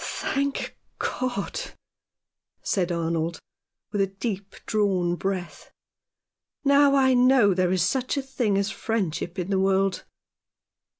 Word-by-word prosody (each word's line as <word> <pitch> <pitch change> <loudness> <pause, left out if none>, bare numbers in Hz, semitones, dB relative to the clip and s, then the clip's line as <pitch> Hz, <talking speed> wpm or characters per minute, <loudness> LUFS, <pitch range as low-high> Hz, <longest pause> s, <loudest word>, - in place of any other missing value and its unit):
"Thank 280 0 -2 0.2
God," 255 - -2 1.0
said 180 -3 0
Arnold, 165 -1 -1 0.5
with 205 -1 0
a 195 - +2
deep 195 0 -5
drawn 190 -5 +1
breath. 185 -1 -4 0.5
" - - -65
Now 280 0 +5
I 260 -1 +4
know 250 -5 +5
there 180 -1 +1
is 185 -2 +2
such 260 - 0
a 275 - -1
thing 240 -7 0
as 200 +1 0
friendship 190 -5 -2
in 180 +1 -3
the 190 - +2
world." 195 0 +1
200 Hz, 125 wpm, -25 LUFS, 180-255 Hz, 1.0 s, Now